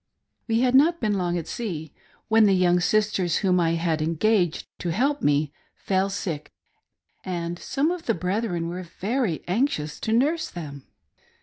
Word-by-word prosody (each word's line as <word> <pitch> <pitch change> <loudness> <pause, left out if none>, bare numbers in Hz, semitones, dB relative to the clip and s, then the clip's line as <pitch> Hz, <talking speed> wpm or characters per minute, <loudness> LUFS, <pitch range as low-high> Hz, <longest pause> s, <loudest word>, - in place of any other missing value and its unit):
We 225 0 +2
had 250 -1 +2
not 325 +6 +5
been 215 -2 0
long 175 -3 0
at 165 - -5
sea 165 -10 -5 0.3
when 220 -1 +5
the 195 - +4
young 180 -1 +3
sisters 190 -2 +1
whom 180 -1 +3
I 165 -1 +2
had 165 -2 0
engaged 175 +2 +1
to 175 - -3
help 275 - +1
me, 145 0 +1 0.2
fell 190 0 0
sick, 170 -6 -4 0.7
and 175 -1 -4
some 295 +5 0
of 355 -2 -5
the 230 - +2
brethren 180 -1 -2
were 175 +2 -4
very 195 - -2
anxious 180 - -1
to 220 - -2
nurse 300 +8 +2
them. 145 -6 -8
185 Hz, 165 wpm, -25 LUFS, 170-225 Hz, 0.7 s, not